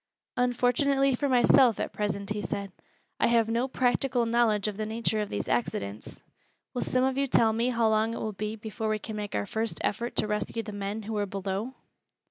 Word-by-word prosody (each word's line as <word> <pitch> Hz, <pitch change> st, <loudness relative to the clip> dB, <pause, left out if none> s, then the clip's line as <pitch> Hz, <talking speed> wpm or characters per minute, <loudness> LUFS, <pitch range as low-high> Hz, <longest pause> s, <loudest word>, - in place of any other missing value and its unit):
"Unfortunately 250 Hz, +3 st, +2 dB
for 280 Hz, +3 st, 0 dB
myself, 250 Hz, -2 st, +5 dB
at -, -, -3 dB
present," 200 Hz, -1 st, -2 dB
he 210 Hz, 0 st, -1 dB
said, 200 Hz, +1 st, -4 dB, 0.5 s
"I -, -, +4 dB
have 230 Hz, -1 st, +3 dB
no 235 Hz, +3 st, 0 dB
practical 250 Hz, -1 st, +1 dB
knowledge 230 Hz, -3 st, +2 dB
of 210 Hz, -, -3 dB
the 215 Hz, +1 st, -3 dB
nature 220 Hz, 0 st, 0 dB
of 210 Hz, -, -2 dB
these 100 Hz, -, -3 dB
accidents. 105 Hz, -3 st, -2 dB, 0.5 s
Will 245 Hz, -, -2 dB
some 255 Hz, 0 st, +1 dB
of 265 Hz, +1 st, +1 dB
you 275 Hz, -, +1 dB
tell 225 Hz, -3 st, +4 dB
me 230 Hz, +3 st, +1 dB
how 235 Hz, -2 st, +2 dB
long 220 Hz, +1 st, +2 dB
it -, -, -5 dB
will 215 Hz, -, -3 dB
be 210 Hz, +2 st, -4 dB
before 220 Hz, 0 st, -4 dB
we 215 Hz, -, +1 dB
can 215 Hz, +1 st, -7 dB
make 210 Hz, -1 st, -4 dB
our 100 Hz, -, 0 dB
first 220 Hz, -, -2 dB
effort 235 Hz, +4 st, -2 dB
to -, -, +2 dB
rescue 210 Hz, +2 st, -2 dB
the 215 Hz, -, -7 dB
men 205 Hz, +2 st, -4 dB
who 220 Hz, +1 st, -4 dB
are 205 Hz, -1 st, 0 dB
below?" 195 Hz, +6 st, -3 dB
220 Hz, 210 wpm, -28 LUFS, 210-245 Hz, 0.5 s, myself